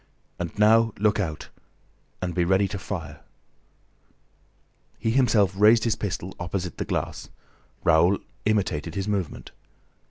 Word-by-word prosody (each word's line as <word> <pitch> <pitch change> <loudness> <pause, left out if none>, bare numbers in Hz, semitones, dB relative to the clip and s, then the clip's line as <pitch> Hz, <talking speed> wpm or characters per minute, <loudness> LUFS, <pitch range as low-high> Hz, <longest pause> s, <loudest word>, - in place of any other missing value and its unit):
"And 85 +1 -5
now, 110 +1 +4
look 105 0 +2
out! 80 -7 -4 0.7
And 90 -1 -2
be 90 - +1
ready 95 +3 +2
to 100 - -5
fire." 80 -6 -6 1.8
He 115 - -1
himself 110 -6 +3
raised 110 +3 +5
his 115 - +1
pistol 95 -2 -4
opposite 90 0 -4
the - - -2
glass. - - -3 0.5
Raoul 85 +4 +4 0.3
imitated 100 -8 0
his 100 0 -2
movement. 100 -6 -3
100 Hz, 125 wpm, -25 LUFS, 90-105 Hz, 1.8 s, raised